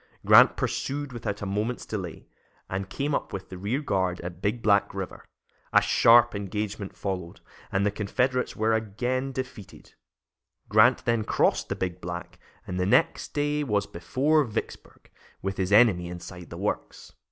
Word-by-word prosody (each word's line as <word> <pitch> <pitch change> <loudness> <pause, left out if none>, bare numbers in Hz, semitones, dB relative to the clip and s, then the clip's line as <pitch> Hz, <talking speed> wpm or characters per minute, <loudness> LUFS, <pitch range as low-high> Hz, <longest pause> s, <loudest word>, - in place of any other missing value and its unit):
Grant - - +7
pursued 145 -1 -2
without 105 -4 -4
a - - -2
moment's 105 +5 -2
delay, 95 -6 -6 0.4
and 95 +1 -4
came 145 +1 -2
up - - -2
with 95 -1 -6
the 95 - -8
rear 110 +9 -1
guard 95 -9 0
at 85 0 -7
Big 110 +3 -1
Black 100 -2 +3
River. - - -6 0.5
A - - +8
sharp 120 0 +5
engagement 100 0 -4
followed, 90 -4 -4 0.3
and 100 +1 +1
the 105 - +2
Confederates 125 +5 -1
were 110 +1 +1
again 120 +5 -1
defeated. 130 -6 -8 0.7
Grant 110 +5 +4
then 115 -2 +1
crossed - - +1
the - - -1
Big 90 -1 -4
Black 85 0 -7 0.3
and 90 0 -4
the 90 - +1
next - - +2
day 145 0 0
was 105 -6 0
before 135 - +1
Vicksburg, 115 -5 -7 0.3
with 95 0 -3
his 95 0 -1
enemy 100 -5 +5
inside 90 0 -9
the - - -8
works. - - -4
105 Hz, 160 wpm, -26 LUFS, 95-125 Hz, 0.7 s, A